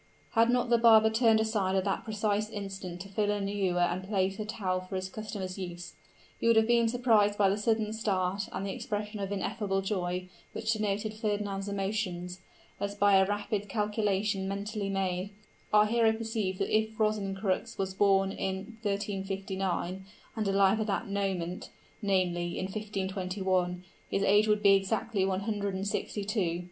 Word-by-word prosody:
Had 230 Hz, 0 st, +4 dB
not 245 Hz, 0 st, +1 dB
the 235 Hz, -, +5 dB
barber 220 Hz, -1 st, +7 dB
turned 225 Hz, -1 st, +4 dB
aside 210 Hz, -4 st, +1 dB
at 190 Hz, -, +2 dB
that 195 Hz, -1 st, -1 dB
precise 215 Hz, -1 st, -1 dB
instant 195 Hz, -4 st, -6 dB
to 195 Hz, -, -7 dB
fill 205 Hz, +1 st, 0 dB
an 205 Hz, -1 st, 0 dB
ewer 190 Hz, -3 st, 0 dB
and 175 Hz, +1 st, +1 dB
place 195 Hz, 0 st, 0 dB
a 215 Hz, -, -2 dB
towel 190 Hz, -4 st, -2 dB
for 185 Hz, +1 st, -7 dB
his 185 Hz, 0 st, -3 dB
customer's 200 Hz, -2 st, -5 dB
use, 175 Hz, -1 st, -6 dB, 0.5 s
he -, -, 0 dB
would 230 Hz, -, +6 dB
have 220 Hz, 0 st, +5 dB
been 235 Hz, 0 st, +4 dB
surprised 225 Hz, -4 st, +3 dB
by 200 Hz, -, +4 dB
the 195 Hz, -, +2 dB
sudden 215 Hz, 0 st, 0 dB
start 195 Hz, -3 st, -1 dB
and 195 Hz, -, -3 dB
the 195 Hz, -, -2 dB
expression 210 Hz, 0 st, -4 dB
of 195 Hz, 0 st, -3 dB
ineffable 200 Hz, -1 st, -1 dB
joy 180 Hz, -2 st, -2 dB, 0.3 s
which 220 Hz, 0 st, -1 dB
denoted 215 Hz, 0 st, -1 dB
Fernand's 205 Hz, -2 st, -2 dB
emotions, 190 Hz, -3 st, -3 dB, 0.4 s
as 200 Hz, 0 st, -3 dB
by 205 Hz, 0 st, +4 dB
a 190 Hz, 0 st, +5 dB
rapid 205 Hz, 0 st, -2 dB
calculation 205 Hz, -1 st, 0 dB
mentally 200 Hz, +1 st, -3 dB
made, 190 Hz, 0 st, -1 dB, 0.4 s
our 210 Hz, 0 st, +6 dB
hero 225 Hz, 0 st, +3 dB
perceived 220 Hz, -4 st, -2 dB
that -, -, 0 dB
if 220 Hz, 0 st, 0 dB
Rosencrux 195 Hz, -3 st, 0 dB
were 195 Hz, -, +1 dB
born 195 Hz, -1 st, +3 dB
in 195 Hz, +4 st, -4 dB
1359, 195 Hz, -2 st, -2 dB, 0.3 s
and 215 Hz, -3 st, -1 dB
alive 195 Hz, +2 st, +4 dB
at 215 Hz, -, -1 dB
that 205 Hz, +2 st, -2 dB
moment 190 Hz, -3 st, -2 dB, 0.3 s
namely, 180 Hz, -4 st, 0 dB
in -, -, -2 dB
1521 190 Hz, -3 st, -2 dB, 0.3 s
his 195 Hz, -, 0 dB
age 205 Hz, +2 st, +4 dB
would 210 Hz, 0 st, +2 dB
be 200 Hz, -1 st, +7 dB
exactly 195 Hz, +1 st, +1 dB
one 190 Hz, 0 st, 0 dB
hundred 200 Hz, -2 st, -2 dB
and 190 Hz, +1 st, -3 dB
sixty 205 Hz, 0 st, -2 dB
two! 185 Hz, -5 st, 0 dB
200 Hz, 170 wpm, -30 LUFS, 190-215 Hz, 0.5 s, barber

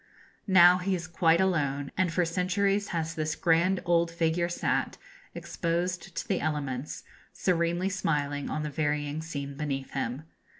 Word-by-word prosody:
Now 180 Hz, -1 st, +7 dB
he 190 Hz, +1 st, 0 dB
is 175 Hz, -2 st, -5 dB
quite 165 Hz, 0 st, +3 dB
alone; 145 Hz, -7 st, 0 dB
and 185 Hz, -2 st, +1 dB
for 175 Hz, +1 st, +1 dB
centuries 195 Hz, +4 st, 0 dB
has 165 Hz, -1 st, -2 dB
this 155 Hz, -1 st, -2 dB
grand 175 Hz, +2 st, +2 dB
old 170 Hz, -1 st, +3 dB
figure 170 Hz, +1 st, 0 dB
sat, 175 Hz, -, -1 dB, 0.4 s
exposed 175 Hz, +1 st, -3 dB
to -, -, -4 dB
the -, -, 0 dB
elements, 145 Hz, -3 st, -3 dB, 0.3 s
serenely 175 Hz, +1 st, 0 dB
smiling 145 Hz, -6 st, -1 dB
on 155 Hz, -, -2 dB
the 150 Hz, -, -4 dB
varying 150 Hz, 0 st, -1 dB
scene 140 Hz, -3 st, -5 dB
beneath 135 Hz, -2 st, -3 dB
him. 135 Hz, +1 st, -3 dB
165 Hz, 145 wpm, -28 LUFS, 150-180 Hz, 0.4 s, Now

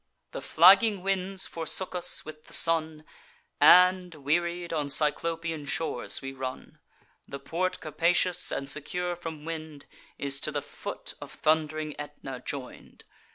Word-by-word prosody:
The -, -, -6 dB
flagging 195 Hz, +3 st, +5 dB
winds 195 Hz, 0 st, -1 dB
forsook 170 Hz, +3 st, -1 dB
us, 180 Hz, -1 st, -1 dB
with 155 Hz, 0 st, -11 dB
the -, -, -9 dB
sun; 160 Hz, -2 st, +1 dB, 0.5 s
And, 180 Hz, -1 st, +6 dB
wearied, 170 Hz, +4 st, -1 dB
on 150 Hz, -3 st, -1 dB
Cyclopian 160 Hz, +1 st, +1 dB
shores 140 Hz, -2 st, -1 dB
we 135 Hz, 0 st, -5 dB
run. 130 Hz, -1 st, -7 dB, 0.5 s
The 140 Hz, -, -6 dB
port 185 Hz, +6 st, -2 dB
capacious, 170 Hz, +3 st, +1 dB
and 140 Hz, -, -3 dB
secure 175 Hz, +5 st, -2 dB
from 160 Hz, -3 st, -8 dB
wind, 155 Hz, -3 st, -7 dB, 0.3 s
Is 140 Hz, 0 st, -1 dB
to 155 Hz, -, -1 dB
the 145 Hz, -1 st, -3 dB
foot -, -, -8 dB
of -, -, -9 dB
thund'ring 155 Hz, -1 st, 0 dB
Aetna 145 Hz, -3 st, -7 dB
join'd. 135 Hz, -3 st, -7 dB
160 Hz, 135 wpm, -28 LUFS, 150-175 Hz, 0.5 s, And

